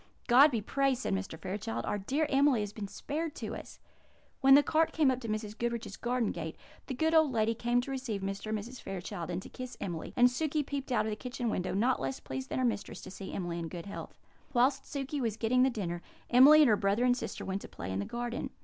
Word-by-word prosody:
"God 265 +5 +7
be 235 -6 -1
praised!" 270 +3 +1
said - - -1
Mr. 195 -4 -3
Fairchild. 160 - -4
"Our 205 - -1
dear 275 +10 0
Emily 275 -4 +3
has 205 -1 -4
been 210 -2 -5
spared 310 - -4
to - - -5
us." - - -10 0.6
When 270 0 +8
the 290 - +7
cart 320 +1 +2
came 300 -5 +4
up 255 - -2
to 235 - -7
Mrs. 215 -1 -3
Goodriche's 235 0 -3
garden 245 -2 0
gate, 160 -2 -5 0.3
the 260 - -3
good 320 +5 +1
old 315 -3 +5
lady 225 -1 +2
came 240 +1 +1
to 270 - -6
receive 255 -7 -3
Mr. 195 +2 -4
and 215 0 0
Mrs. 235 +4 -8
Fairchild, 180 -3 -5
and 180 +1 -3
to - - -9
kiss 255 -1 -8
Emily; 170 -4 -4
and 245 0 +7
Sukey 300 +3 0
peeped 275 -2 -4
out 215 -4 +2
of 220 - -2
the - - -2
kitchen 245 0 -3
window, 185 -1 -2
not 245 +6 +2
less 135 0 -3
pleased 130 0 -6
than - - -2
her 255 - +2
mistress 230 -4 -2
to 190 - -9
see 195 0 -7
Emily 175 -2 -3
in 165 - -4
good 170 +1 -7
health. 200 - -8 0.4
Whilst 260 +2 +3
Sukey 280 0 -3
was 225 -3 -1
getting 240 +3 +2
the 260 - +5
dinner, 175 -8 -3 0.3
Emily 285 +5 +9
and 275 - +5
her 215 - +6
brother 200 +4 +2
and 245 -1 +4
sister - - -5
went 195 +1 -2
to - - -8
play 95 - -7
in 95 - -2
the 100 - -2
garden. 240 0 -4
235 Hz, 250 wpm, -31 LUFS, 195-265 Hz, 0.6 s, Emily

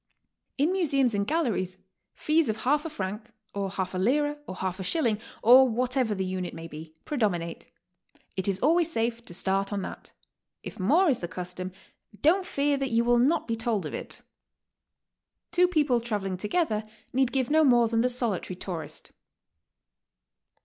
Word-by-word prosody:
In 295 +5 +2
museums 275 -10 +2
and 200 0 0
galleries, 220 - -1 0.4
fees 310 -3 +2
of 220 0 -3
half 295 +4 +2
a - - -2
franc, 210 -3 -5 0.2
or 200 -1 -2
half 190 -1 -3
a 185 - -2
lira, 290 +8 +1
or 185 - -6
half 185 0 -3
a - - -3
shilling, 220 - 0 0.2
or 255 +3 +8
whatever 250 -1 0
the 190 -1 -2
unit 185 -1 -4
may 165 0 -7
be, 160 0 -10
pre 295 - -3
dominate. 175 -6 -1 0.7
It 190 0 -1
is 195 -1 0
always 330 +4 +3
safe 230 -2 -1
to 175 - -9
start 195 +2 0
on 200 -2 -2
that; - - -8 0.5
if - - -8
more 305 - +4
is 270 -6 +2
the 175 - -4
custom, 180 +2 -5 0.5
don't 365 +5 +3
fear 285 -5 +1
that 270 -1 -1
you 230 0 +2
will 240 0 +3
not 295 +6 +2
be 230 - 0
told 225 -5 -1
of - - -5
it. - - -7 1.3
Two 355 +1 +4
people 295 -9 +2
traveling 205 -5 -2
together 215 - 0 0.3
need 260 -1 +2
give 265 -1 0
no 315 +1 +5
more 240 -4 +5
than 225 0 +1
the 250 - +2
solitary 230 -7 0
tourist. 175 -3 -6
230 Hz, 175 wpm, -27 LUFS, 190-280 Hz, 1.3 s, or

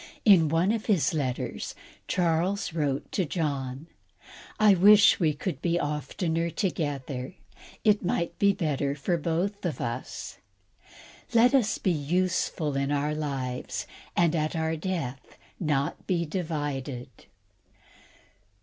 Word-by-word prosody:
In 180 -8 +7
one 165 +6 +2
of 225 -1 -2
his 195 -9 +2
letters, 135 -5 -3 0.3
Charles 180 +3 0
wrote 145 -4 -1
to 190 - +1
John: 140 -4 -3 0.7
"I 215 -2 +7
wish 205 +3 +7
we 160 -4 +3
could 175 +5 -4
be 170 0 +1
oftener 160 +3 -1
together; 145 -6 -3 0.5
it 210 -2 +3
might 170 -1 -1
be 200 0 +5
better 145 -6 -1
for 150 +5 -2
us 170 - 0
both. 170 - -3 1.0
Let 240 +3 +6
us 230 -5 +3
be 185 - +1
useful 165 -1 0
in 140 +1 0
our 145 +1 0
lives, 135 -5 -3 0.3
and 170 -1 +3
at 155 +1 -1
our 160 0 0
death 160 -7 -4 0.2
not 150 -2 -1
divided." 150 -7 -2
160 Hz, 115 wpm, -27 LUFS, 145-185 Hz, 1.0 s, In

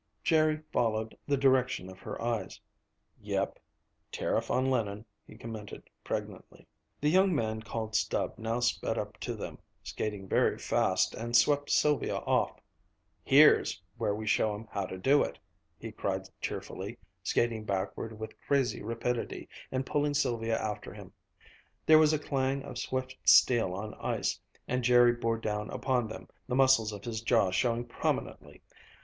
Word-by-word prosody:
Jerry 155 -1 +2
followed 110 -1 0
the 145 -1 +2
direction 130 -7 +2
of 95 0 -11
her - - -7
eyes. 115 -5 -3 0.6
"Yep - - -2 0.5
tariff - - -1
on 130 +1 +2
linen," 105 -3 -1 0.2
he 110 - -13
commented 110 -2 -8 0.2
pregnantly. - - -6 0.3
The 150 - +2
young 190 +1 +4
man 110 -3 -1
called 110 -1 -5
Stub - - 0
now 115 +2 -2
sped 120 - 0
up - - -5
to - - -4
them, - - -7 0.2
skating 105 -3 -4
very - - +2
fast, - - +1
and 120 +1 -3
swept 145 +4 +3
Sylvia 150 -4 +2
off. - - 0 0.6
"Here's 145 -6 +5 0.2
where 105 -3 0
we 110 +1 -5
show 105 0 +2
'em 110 +2 -9
how 100 -2 -2
to 95 - -6
do 135 +10 +4
it!" - - -2 0.4
he - - -7
cried - - -2 0.2
cheerfully, 100 +6 -5 0.2
skating 115 +3 0
backward 105 +2 -3
with 110 0 -8
crazy 140 -3 +1
rapidity, 115 +2 -3 0.2
and 130 0 -1
pulling 145 0 0
Sylvia 115 -5 0
after 105 -2 -4
him. - - -11 0.7
There 155 0 +8
was 155 -1 +5
a 155 - +2
clang 135 -2 -1
of 125 -3 -7
swift 130 0 -3
steel 110 -8 +5
on 105 +2 -5
ice, - - -2 0.3
and 125 0 -1
Jerry 120 0 +6
bore 115 -1 -1
down 105 -1 -3
upon 125 -4 0
them, 110 - -9 0.2
the 125 - -1
muscles 130 -5 +4
of 100 -1 -8
his 115 -2 -3
jaw 115 -5 +3
showing 120 +5 +1
prominently. 120 - -3
115 Hz, 155 wpm, -30 LUFS, 110-130 Hz, 0.7 s, There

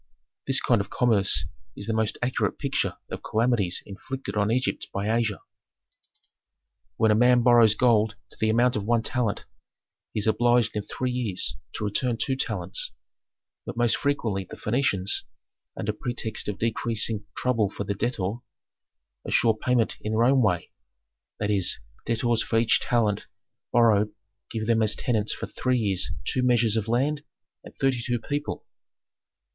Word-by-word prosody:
"This - - +4
kind - - +2
of - - -7
commerce 100 -9 +2 0.3
is 100 - -6
the 115 - -1
most 110 -1 0
accurate 125 +1 0
picture - - -1
of - - -5
calamities 110 -5 +1
inflicted 105 +2 -6
on 105 0 +1
Egypt 125 +3 -1
by 105 +3 0
Asia. 110 -3 0 1.6
"When 110 -1 +4
a - - +4
man 125 +1 +5
borrows 115 -3 +6
gold 110 -3 +3 0.2
to - - -8
the 110 - +2
amount 120 +3 +3
of 105 - -1
one 115 +1 +1
talent, 120 -5 -1 0.7
he - - -2
is 105 - +1
obliged 120 0 +3
in 105 - 0
three 125 +5 -3
years 120 -7 -1 0.2
to - - -4
return 115 +4 0
two 135 +2 0
talents. 95 - -2 0.7
But - - -7
most 120 -1 +3
frequently 115 -9 -1
the - - -10
Phœnicians, 105 -5 0 0.6
under 105 - -2
pretext 115 0 -3
of 105 -1 -3
decreasing 115 -2 -1
trouble 115 -5 +1
for 100 - -5
the 100 - -2
debtor, 105 -1 -2 0.9
assure 115 -2 +2
payment 120 +1 +1
in 110 - -3
their 110 +1 +3
own 130 +2 +4
way: 90 -7 0 0.7
that 105 0 0
is, 95 -3 +2 0.3
debtors 115 0 +1
for 115 - 0
each 115 0 +4
talent 110 -4 0 0.4
borrowed 110 -3 +4 0.4
give 110 -1 -3
them 115 0 +2
as 110 -1 +3
tenants 110 -4 0
for - - -4
three 130 0 -1
years 100 -6 0 0.2
two 130 - +1
measures 120 -3 +3
of 110 -1 -1
land 140 +6 0 0.4
and - - -13
thirty 135 -3 +1
two 120 0 0
people. 145 +4 -4
115 Hz, 160 wpm, -26 LUFS, 105-120 Hz, 1.6 s, borrows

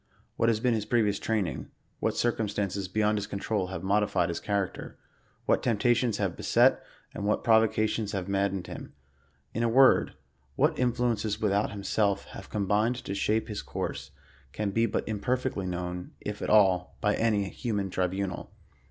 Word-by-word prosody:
What 115 - +2
has 110 -2 +1
been 125 +1 +2
his 110 -2 -2
previ 115 -2 +3
ous 100 - -2
training, 105 -7 -2 0.3
what - - -1
circumstances 100 -4 -1
beyond 105 +2 +1
his 100 - -5
control 100 -1 -2
have 90 -2 -6
modi 105 +2 +2
fied 90 -3 0
his 85 - -3
character, 100 -2 -3 0.5
what - - +2
temptations 120 0 +2
have 95 -5 -1
beset - - +3 0.3
and - - -5
what 105 - +1
provo 110 -1 +5
cations 110 0 -1
have 95 -2 -3
maddened 100 -1 0
him; - - -9 0.6
in 115 - -2
a 115 - +2
word« 130 +2 +5 0.4
what - - +2
influences 120 -4 0
with 105 -2 +1
out, 100 +1 +1
himself 100 0 0
have 100 - -9
combined 105 +3 +1
to 120 -5 -5
shape 110 +2 0
his 105 -2 -4
course, - - -5 0.4
can 105 -2 -2
be 115 +3 +2
but - - -2
im 110 -2 -2
perfectly 125 -4 -1
known, 90 0 -4
if 105 0 -6
at - - -2
all, 95 -4 +3
by 105 -1 +2
any 105 -3 +1
human 100 -6 -3
tribunal. 95 0 -2
105 Hz, 175 wpm, -28 LUFS, 100-110 Hz, 0.6 s, provo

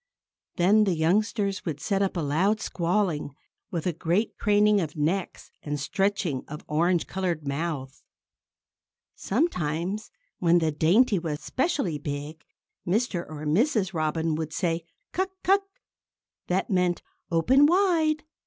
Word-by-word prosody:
Then 205 +5 +4
the 190 -3 +1
youngsters 200 +4 +1
would 155 -4 -4
set 195 +5 0
up 195 -2 0
a - - 0
loud 180 +9 +1
squalling, 170 -7 -1 0.3
with 170 -3 -3
a 180 - 0
great 175 +7 0
craning 210 -1 +4
of 155 -3 -4
necks 170 +5 -2
and 145 -1 -3
stretching 195 -3 -1
of 150 +1 -8
orange 170 +3 +1
colored 175 -6 -3
mouths. 140 -2 -4 1.1
Sometimes, 190 - -1 0.3
when 175 -1 +4
the 160 -2 +1
dainty 190 - +3
was 155 -3 -4
specially 260 - -1
big, 145 +2 -6 0.4
Mr. 190 -1 0
or 155 -1 -7
Mrs. 195 - +1
Robin 160 0 0
would 155 0 -3
say, 165 -2 -1 0.3
"Cuck! 375 +1 0
cuck!" 390 +2 +4 0.9
That 185 +3 0
meant 180 -2 +1 0.3
"Open 255 - +5
wide!" 330 -4 +2
175 Hz, 130 wpm, -26 LUFS, 155-210 Hz, 1.1 s, Open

